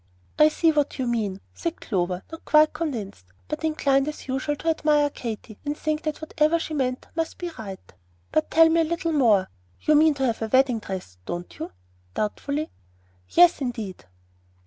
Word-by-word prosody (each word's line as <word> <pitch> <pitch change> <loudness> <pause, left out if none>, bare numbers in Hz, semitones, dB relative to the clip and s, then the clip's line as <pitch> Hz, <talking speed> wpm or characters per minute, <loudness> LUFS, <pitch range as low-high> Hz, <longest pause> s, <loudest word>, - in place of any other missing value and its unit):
"I 305 0 +8
see 325 +1 +3
what 295 -2 0
you 260 - -1
mean," 210 -5 -1
said 335 -1 -4
Clover, 180 -3 -2
not 325 - -9
quite 305 0 +5
convinced, 240 - -4 0.2
but - - -4
inclined 280 -3 +2
as 305 - -6
usual 270 +3 -1
to 325 - -2
admire 300 -2 +2
Katy 220 -4 -7
and 290 0 -3
think 310 0 -1
that 310 -1 -3
whatever 315 +1 +2
she 325 -1 -5
meant 255 -3 -1
must 325 -1 -2
be 350 -1 -4
right. 195 - -9 0.4
"But 310 - +1
tell 325 0 +6
me 330 +1 +4
a - - +3
little 335 +1 -1
more. 220 -10 +4 0.3
You 305 - +3
mean 305 0 +5
to 270 -1 0
have 230 -3 -1
a 225 - -1
wedding 260 0 +3
dress, 185 - -7
don't 175 0 -5
you?" - - -5 0.4
doubtfully. 285 +8 -2 0.6
"Yes, 350 -2 +5
indeed!" 225 - -4
290 Hz, 180 wpm, -25 LUFS, 225-310 Hz, 0.6 s, I